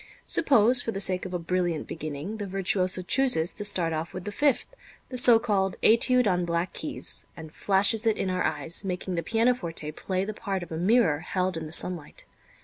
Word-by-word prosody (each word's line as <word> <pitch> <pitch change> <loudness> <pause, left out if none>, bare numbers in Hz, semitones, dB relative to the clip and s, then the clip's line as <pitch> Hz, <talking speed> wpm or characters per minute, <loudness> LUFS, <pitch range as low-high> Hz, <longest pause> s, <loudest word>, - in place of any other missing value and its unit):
Suppose, 245 -4 +4
for 230 - -4
the 195 - -5
sake 185 -1 +4
of 185 - -10
a - - +1
brilliant 175 -1 -2
beginning, 155 +6 -6
the 205 -2 -6
virtuoso 185 -1 -1
chooses 195 -7 +1
to 205 - -4
start 175 -5 +1
off 160 +2 -5
with 185 0 -7
the 205 - -4
fifth, 285 +5 +1 0.4
the 255 - -7
so 245 -2 +9
called 200 -5 -1
"Étude 250 +2 +4
on 180 -3 +1
Black 170 +1 -2
Keys," - - -5
and 160 -1 -11
flashes 205 +3 +1
it 220 - +1
in - - -2
our 185 - -1
eyes, 155 +2 -2
making 185 -1 -4
the 170 - -2
pianoforte 220 -9 -1
play 185 +4 -3
the 215 - -5
part 195 -4 -4
of 175 - -12
a - - -4
mirror 180 -4 +2
held 185 +2 -2
in 160 -1 -5
the - - -11
sunlight. 170 -2 0
185 Hz, 205 wpm, -26 LUFS, 170-220 Hz, 0.4 s, so